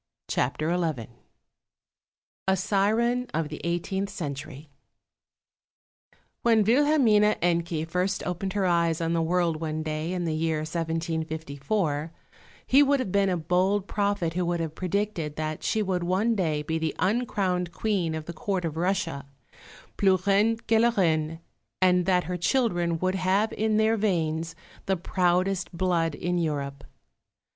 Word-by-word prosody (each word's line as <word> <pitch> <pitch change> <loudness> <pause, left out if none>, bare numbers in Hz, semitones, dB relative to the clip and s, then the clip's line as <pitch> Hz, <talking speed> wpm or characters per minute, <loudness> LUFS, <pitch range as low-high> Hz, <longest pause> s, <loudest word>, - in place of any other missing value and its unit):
CHAPTER 155 +7 0
XI 155 -10 -2 1.4
A 190 0 +3
SIREN 220 +6 +1
OF 160 -1 -1
THE 155 - -7
EIGHTEENTH 185 +3 -2
CENTURY 145 -4 -6 1.7
When 225 -2 +4
Wilhelmine 230 -4 +4
Encke 170 -2 0
first 180 +3 -1
opened 185 +2 -3
her 200 -2 0
eyes 170 -2 +2
on 165 0 0
the 165 - +1
world 170 -1 +1
one 155 -1 -2
day 155 +2 -3
in 180 -1 -2
the 160 - -1
year 155 0 0
1754, 160 0 -2 0.5
he 275 - +5
would 285 0 +3
have 220 -8 -2
been 200 0 +2
a 180 - 0
bold 185 +4 +1
prophet 200 -5 0
who 180 +1 0
would 175 0 -1
have 160 -2 -3
predicted 185 -4 -2
that 155 0 -3
she 220 - 0
would 185 -2 -1
one 190 +6 +1
day 160 -8 0
be 160 +2 -2
the 160 -1 -2
uncrowned 190 -5 0
Queen 180 -6 -1
of 160 -1 -5
the 170 - -6
Court 185 +2 -2
of 160 -1 -4
Russia, 165 -6 -1 0.7
plus 185 -2 +3
Reine 205 +3 +3
que 225 -1 +3
la 235 +1 +5
Reine, 160 -3 +1 0.4
and 180 -1 +3
that 180 -2 +3
her 180 +2 -3
children 175 -5 +1
would 185 +3 0
have 190 +3 +1
in 215 0 +1
their 220 +1 +3
veins 165 -5 -1 0.3
the 190 -1 +1
proudest 180 +1 0
blood 170 -4 +1
in 175 +2 -1
Europe. 140 -4 -3
180 Hz, 150 wpm, -26 LUFS, 160-200 Hz, 1.7 s, he